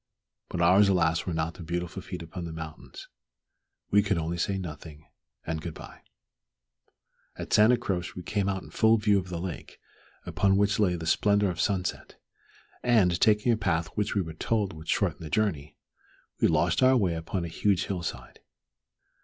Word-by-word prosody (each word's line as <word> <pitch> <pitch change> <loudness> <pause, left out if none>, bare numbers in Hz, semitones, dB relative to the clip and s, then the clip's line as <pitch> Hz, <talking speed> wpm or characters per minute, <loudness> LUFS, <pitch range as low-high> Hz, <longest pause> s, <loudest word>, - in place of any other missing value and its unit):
But 85 - -3
ours, 95 +4 +5
alas! 85 -3 +1
were 90 - -1
not 80 +1 -1
the - - -12
beautiful 85 +3 -4
feet 90 -2 -7
upon 85 +2 -7
the 85 - -6
mountains. 80 -1 -9 0.8
We 105 - +5
could 100 -2 0
only 85 +1 -3
say 95 +3 0
"nothing" 75 -3 -8 0.4
and 80 0 -3
"good 85 -1 -6
bye." - - -12 1.3
At - - -6
Santa 110 +4 +6
Croce 95 -5 -3
we 90 - -7
came 100 +2 -1
out 95 -1 -3
in - - -13
full 110 +1 +4
view 105 -2 +3
of 95 -1 -7
the 85 -2 -4
lake, 90 0 -7 0.5
upon 95 -1 +2
which 100 +1 +2
lay 95 -4 +2
the 85 -1 -6
splendor 100 +3 +2
of 85 - -3
sunset, 95 -2 -2 0.7
and, 100 -8 +3
taking 110 +2 +4
a 115 - +2
path 85 -5 0
which 105 +5 -2
we 100 - +2
were 80 -1 -7
told 100 +3 -1
would 80 0 -11
shorten - - 0
the 80 - -6
journey, 80 -6 -1 0.6
we - - +4
lost 85 -1 +2
our 130 0 +5
way 95 -7 +1
upon 85 +2 -3
a - - -4
huge 95 +3 0
hill 95 -3 -3
side. 85 - -7
90 Hz, 185 wpm, -27 LUFS, 85-100 Hz, 1.3 s, Santa